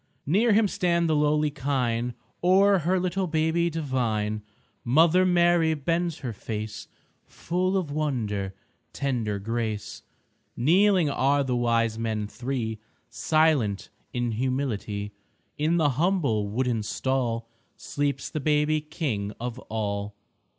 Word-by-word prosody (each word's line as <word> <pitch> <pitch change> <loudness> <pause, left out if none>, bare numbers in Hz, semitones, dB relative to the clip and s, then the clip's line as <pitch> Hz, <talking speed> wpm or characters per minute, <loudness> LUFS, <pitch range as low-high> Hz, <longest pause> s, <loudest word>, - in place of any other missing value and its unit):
Near 210 - +3
Him 215 0 +4
stand 170 -3 +1
the 160 - +2
lowly 150 0 +2
kine, 125 -4 -1 0.3
O'er 195 +2 +5
her 180 +3 +1
little 185 +1 -1
babe 160 +2 +1
divine 115 -9 -1 0.4
Mother 165 +8 +4
Mary 175 -2 +3
bends 165 +3 -1
her 120 - -3
face 105 0 -6 0.4
Full 185 +3 -1
of 170 -6 -2
wonder, 110 -10 -2 0.4
tender 120 -7 -1
grace. 110 0 -3 0.6
Kneeling 175 +4 +4
are 140 +1 +2
the 130 -2 -1
Wise 115 -2 +1
Men 110 -2 -1
Three, 120 -1 -4 0.3
Silent 155 -11 +1 0.2
in 120 -1 -1
humility. 110 -4 -2 0.5
In 160 +3 +2
the 155 -3 +3
humble 140 - +1
wooden 120 +1 0
stall 115 0 -1 0.3
Sleeps 140 -2 -2
the 155 - -2
baby 150 +1 +2
King 125 - -3
of 120 +1 -5
all. 100 -2 -3
135 Hz, 120 wpm, -26 LUFS, 115-165 Hz, 0.6 s, O'er